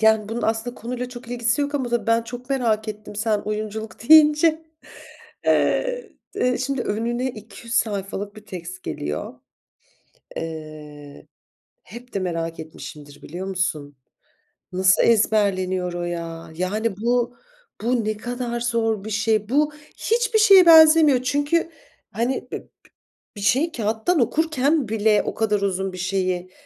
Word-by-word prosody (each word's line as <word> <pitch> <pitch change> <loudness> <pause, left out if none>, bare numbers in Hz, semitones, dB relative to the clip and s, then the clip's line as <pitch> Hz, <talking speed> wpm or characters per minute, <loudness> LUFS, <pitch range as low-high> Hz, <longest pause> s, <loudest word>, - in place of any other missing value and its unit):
yani, 220 -1 +3
bunun 230 +2 -4
aslında 225 +2 -1
konuyla 250 +1 -5
çok 245 -1 -11
ilgisi 235 +1 0
yok 285 0 -2
ama 240 -4 -1
ben 230 0 +3
çok 245 +3 -9
merak 225 -5 0
ettim 210 -1 -8
sen 215 0 +1
oyunculuk 215 +2 -5
deyince. 315 +1 +6 0.8
Eee, - - +1 0.2
d 250 0 +1
şimdi 265 0 -2
önüne 235 +4 -2
200 225 +2 -9
sayfalık 205 0 -2
bir 215 0 -13
text 180 0 -8
geliyor. 75 +1 -4 1.0
Eee, 155 -3 -8 0.6
hep 240 +4 -12
de - - 0
merak 165 -3 -3
etmişimdir 150 -2 -11
biliyor 180 +4 -6
musun? 155 -7 -3 0.8
Nasıl 185 +1 +3
ezberleniyor 185 -5 +2
o 175 0 -4
ya? 170 -1 -5
Yani, 195 +4 -2
bu 240 +2 0 0.5
bu 235 -1 0
ne 215 0 -1
kadar 245 +1 -4
zor 225 -3 0
bir 220 - -6
şey? 220 0 0
Bu 300 +3 +2 0.2
hiçbir 460 -1 +1
şeye 395 -4 +8
benzemiyor. 315 -4 +7
Çünkü, 290 +6 0 0.4
hani, 250 +2 -2
b - - -2
b - - -24 0.7
bir - - -7
şeyi 265 - +2
kağıttan 225 +8 0
okurken 290 +1 +1
bile 215 -1 +2
o - - -3
kadar 210 -2 0
uzun 190 -1 -1
bir 185 - -8
şeyi, 185 -1 -1
220 Hz, 135 wpm, -22 LUFS, 190-250 Hz, 1.0 s, şeye